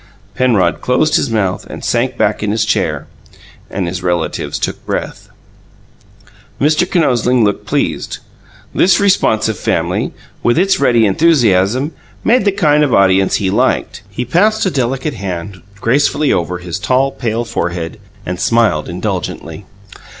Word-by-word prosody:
Penrod 120 Hz, -7 st, +1 dB
closed 150 Hz, +5 st, +2 dB
his 140 Hz, -, +1 dB
mouth 100 Hz, -5 st, -1 dB
and -, -, -7 dB
sank 120 Hz, +1 st, 0 dB
back 105 Hz, 0 st, +1 dB
in 105 Hz, -, -1 dB
his 110 Hz, +1 st, 0 dB
chair -, -, -1 dB, 0.6 s
and 95 Hz, -2 st, -3 dB
his 90 Hz, +1 st, -4 dB
relatives 85 Hz, -2 st, -2 dB
took -, -, -4 dB
breath. -, -, -5 dB, 1.3 s
Mr. 155 Hz, +5 st, +2 dB
Kinosling 125 Hz, -, +2 dB
looked 105 Hz, -1 st, -1 dB
pleased. -, -, -2 dB, 0.6 s
This 180 Hz, -1 st, +4 dB
responsive 110 Hz, -, +2 dB
family, -, -, -1 dB, 0.3 s
with 120 Hz, -, +2 dB
its 195 Hz, +3 st, +2 dB
ready 120 Hz, -5 st, +3 dB
enthusiasm, 120 Hz, -, +2 dB, 0.3 s
made 240 Hz, -1 st, +3 dB
the 200 Hz, -, +4 dB
kind 150 Hz, -6 st, +3 dB
of 145 Hz, -, +2 dB
audience 95 Hz, 0 st, +3 dB
he 95 Hz, -2 st, 0 dB
liked. -, -, 0 dB
He 120 Hz, +5 st, -4 dB
passed 205 Hz, -, +2 dB
a 190 Hz, -, +1 dB
delicate 135 Hz, +2 st, -1 dB
white 115 Hz, -, -10 dB
hand 95 Hz, 0 st, -5 dB, 0.2 s
gracefully 140 Hz, +5 st, +2 dB
over 90 Hz, +1 st, -1 dB
his 90 Hz, +1 st, -5 dB
tall, 130 Hz, +6 st, +1 dB
pale 115 Hz, -2 st, -2 dB
forehead, 85 Hz, -3 st, -3 dB, 0.3 s
and 90 Hz, 0 st, -4 dB
smiled 110 Hz, -9 st, +1 dB
indulgently. 80 Hz, +5 st, -4 dB
115 Hz, 145 wpm, -15 LUFS, 95-145 Hz, 1.3 s, This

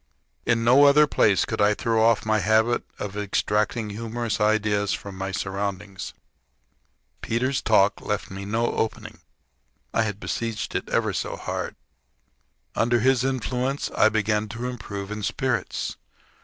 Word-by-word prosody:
In 115 Hz, -1 st, +2 dB
no 130 Hz, +5 st, +6 dB
other 145 Hz, +2 st, +7 dB
place 105 Hz, -8 st, +3 dB
could -, -, -2 dB
I 105 Hz, +1 st, +4 dB
throw 115 Hz, -1 st, +1 dB
off 115 Hz, 0 st, +3 dB
my 110 Hz, 0 st, +2 dB
habit 110 Hz, +3 st, +3 dB, 0.2 s
of 100 Hz, -1 st, -5 dB
extracting 105 Hz, +2 st, 0 dB
humorous 115 Hz, +1 st, -3 dB
ideas 105 Hz, -1 st, +2 dB
from 100 Hz, -1 st, -6 dB
my 95 Hz, +1 st, -4 dB
surroundings. 95 Hz, 0 st, -4 dB, 1.1 s
Peter's 130 Hz, +4 st, 0 dB
talk 105 Hz, -2 st, +3 dB
left 105 Hz, -2 st, -3 dB
me 95 Hz, +1 st, -6 dB
no 110 Hz, +4 st, 0 dB
opening 110 Hz, -, -3 dB, 0.7 s
had 110 Hz, 0 st, +2 dB
I -, -, 0 dB
besieged 110 Hz, +1 st, -4 dB
it -, -, -3 dB
ever -, -, +1 dB
so -, -, -3 dB
hard. -, -, -4 dB, 1.0 s
Under 120 Hz, +1 st, +2 dB
this 125 Hz, +2 st, +3 dB
influence 130 Hz, +1 st, -1 dB
I -, -, +4 dB
began 105 Hz, 0 st, 0 dB
to 120 Hz, +3 st, -5 dB
improve 100 Hz, -5 st, -6 dB
in 105 Hz, 0 st, -4 dB
spirits. 105 Hz, -, -2 dB
110 Hz, 140 wpm, -25 LUFS, 105-120 Hz, 1.1 s, other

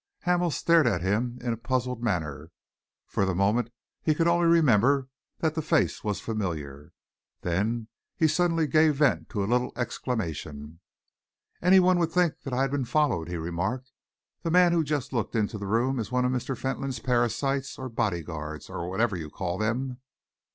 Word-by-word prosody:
Hamel 180 Hz, -1 st, +2 dB
stared 165 Hz, -1 st, +3 dB
at 90 Hz, -7 st, 0 dB
him 115 Hz, +6 st, 0 dB
in 120 Hz, -2 st, 0 dB
a -, -, -5 dB
puzzled 125 Hz, +1 st, -2 dB
manner. 80 Hz, -8 st, -2 dB, 0.6 s
For -, -, -1 dB
the 95 Hz, -2 st, 0 dB
moment 105 Hz, +5 st, +2 dB, 0.3 s
he 155 Hz, -, +2 dB
could 165 Hz, +2 st, +2 dB
only 170 Hz, 0 st, +3 dB
remember 135 Hz, -4 st, +4 dB, 0.3 s
that 160 Hz, -2 st, +1 dB
the 160 Hz, -, -1 dB
face 160 Hz, 0 st, +1 dB
was 105 Hz, -3 st, -1 dB
familiar. 80 Hz, -9 st, -4 dB, 0.5 s
Then 110 Hz, +6 st, -1 dB, 0.3 s
he 160 Hz, -, +4 dB
suddenly 165 Hz, 0 st, +2 dB
gave 155 Hz, +1 st, +4 dB
vent 145 Hz, 0 st, +2 dB
to 105 Hz, -5 st, -2 dB
a -, -, 0 dB
little 125 Hz, +4 st, +1 dB
exclamation. 80 Hz, -, -4 dB, 0.8 s
"Any 185 Hz, +2 st, +6 dB
one 185 Hz, -1 st, +4 dB
would 165 Hz, -1 st, +1 dB
think 180 Hz, -3 st, +1 dB
that 135 Hz, -, -6 dB
I 125 Hz, +2 st, +1 dB
had 135 Hz, -, -1 dB
been 140 Hz, -2 st, 0 dB
followed," 120 Hz, -, +1 dB
he 90 Hz, -, -3 dB
remarked. 95 Hz, +11 st, -3 dB, 0.5 s
"The 165 Hz, -, -2 dB
man 175 Hz, +1 st, +5 dB
who 170 Hz, -, +3 dB
has 155 Hz, -, 0 dB
just 140 Hz, -3 st, -2 dB
looked 115 Hz, -3 st, -2 dB
into 105 Hz, -1 st, 0 dB
the 100 Hz, -, -5 dB
room 120 Hz, +5 st, +1 dB
is 110 Hz, 0 st, -4 dB
one 125 Hz, 0 st, +2 dB
of 125 Hz, -, +1 dB
Mr. 130 Hz, 0 st, -2 dB
Fentolin's 135 Hz, 0 st, -3 dB
parasites 125 Hz, +3 st, 0 dB
or 130 Hz, -, -5 dB
bodyguards, 80 Hz, -, -3 dB
or 85 Hz, 0 st, -4 dB
whatever 105 Hz, +2 st, +1 dB
you 80 Hz, -3 st, -5 dB
call 90 Hz, +3 st, -4 dB
them." 125 Hz, +4 st, -2 dB
120 Hz, 180 wpm, -27 LUFS, 95-145 Hz, 0.8 s, Any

